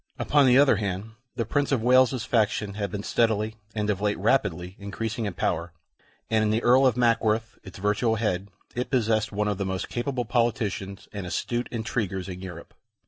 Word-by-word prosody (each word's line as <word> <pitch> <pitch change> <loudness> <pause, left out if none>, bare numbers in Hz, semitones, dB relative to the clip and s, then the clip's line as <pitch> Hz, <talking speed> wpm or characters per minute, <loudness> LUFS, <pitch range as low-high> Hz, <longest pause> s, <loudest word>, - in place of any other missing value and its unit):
Upon 145 -2 +3
the 125 0 +6
other 140 -6 +5
hand, 100 +1 -3 0.2
the 115 -2 -1
Prince 145 +6 0
of 125 -5 +1
Wales's 130 0 +4
faction 105 -4 +1
had 100 -1 -3
been 100 -1 -5
steadily, 110 -1 +1 0.2
and 105 -1 -1
of 100 -2 -1
late 105 0 +1
rapidly, 95 -5 0
increasing 110 +3 -4
in 100 -4 -4
power, 85 +1 -1 0.5
and 110 -1 +2
in 105 - +1
the 110 +2 +1
Earl 130 +2 +6
of 125 -2 +1
Mackworth, 115 -1 +1
its 95 - -11
virtual 105 +3 +1
head, 100 -3 -1 0.2
it 125 0 -3
possessed 110 -4 +1
one 105 0 -1
of 105 -2 -1
the - - 0
most 95 -1 -3
capable 125 0 -2
politicians 110 -4 -1
and 100 -3 -5
astute 120 +7 -2
intriguers 110 -5 -3
in 90 -1 -7
Europe. 90 -3 -9
110 Hz, 190 wpm, -26 LUFS, 100-120 Hz, 0.5 s, the